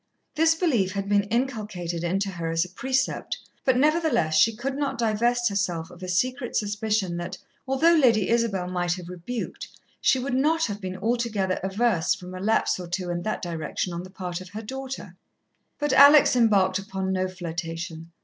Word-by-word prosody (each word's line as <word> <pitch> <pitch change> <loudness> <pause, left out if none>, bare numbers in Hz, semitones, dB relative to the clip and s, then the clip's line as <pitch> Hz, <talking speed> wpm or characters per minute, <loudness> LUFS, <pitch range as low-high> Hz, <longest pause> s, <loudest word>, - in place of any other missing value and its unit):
This 325 +1 +3
belief 240 - +1
had 200 0 -3
been 205 0 +2
inculcated 210 -8 -2
into 195 +3 0
her 170 -2 -4
as 165 +1 +1
a - - -11
precept 260 +7 -1 0.3
but, 260 -2 +3
nevertheless, 305 - +2
she 225 +5 +4
could 265 +4 -3
not 285 -1 -2
divest 240 +2 +1
herself 180 -5 -2
of 175 - -14
a 185 - -5
secret 250 +8 -1
suspicion 210 -3 0
that, 175 +1 -5 0.3
although 280 +6 +4
Lady 235 - +4
Isabel 225 -6 +1
might 175 -1 0
have 175 -1 -7
rebuked, 180 +7 -5 0.3
she - - +4
would 255 0 -3
not 315 +5 +2
have 205 -1 -5
been 185 -1 -5
altogether 220 -3 0
averse 190 -2 +1
from 180 0 -10
a 185 - -6
lapse 210 -1 +1
or 180 - -6
two 175 +1 -3
in 175 0 -2
that 215 +2 -3
direction 170 +1 -3
on 170 - -4
the 185 - -10
part 185 -2 -5
of 185 - -10
her 215 +3 -7
daughter. 265 +3 -6 0.6
But 295 -1 0
Alex 285 -1 +8
embarked 200 -5 +3
upon 190 -1 -3
no 185 0 0
flirtation. 165 -2 -6
200 Hz, 180 wpm, -25 LUFS, 180-245 Hz, 0.6 s, Alex